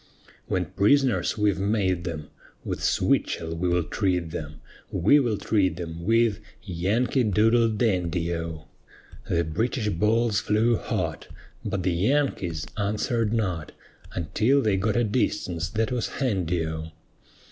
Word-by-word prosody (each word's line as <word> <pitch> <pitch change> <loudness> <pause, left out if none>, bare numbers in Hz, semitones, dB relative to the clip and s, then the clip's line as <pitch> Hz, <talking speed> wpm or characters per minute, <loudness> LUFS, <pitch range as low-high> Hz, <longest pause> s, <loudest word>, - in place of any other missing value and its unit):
"When - - 0
prisoners 130 +4 +2
we've 105 -3 +2
made 95 -3 0
them, 80 -4 -5 0.3
With - - -3
switchell 80 0 0
we 90 +2 -1
will 85 0 +2
treat 90 -1 -1
them, 75 -3 -6 0.3
We 100 - +4
will 120 -6 0
treat 95 -7 +1
them 85 -1 -6
with 115 -1 +3 0.2
'Yankee 105 +8 0
Doodle 115 +3 +4
Dandy' 90 -6 0
O;" 80 -2 -5 0.6
The 85 0 +2
British 105 - -1
balls 105 +3 +2
flew 110 +2 +2
hot, 85 - -3 0.4
But 100 -3 -2
the 90 - +1
Yankees 95 - 0
answered 105 +2 0
not, 95 -9 -2 0.4
Until 110 - +2
they 105 -3 +2
got 100 +2 0
a 120 - +3
distance 100 -6 -1
that 115 +2 -1
was 125 -2 -1
handy 90 -10 -1
O. 80 0 -4
100 Hz, 135 wpm, -26 LUFS, 85-115 Hz, 0.6 s, We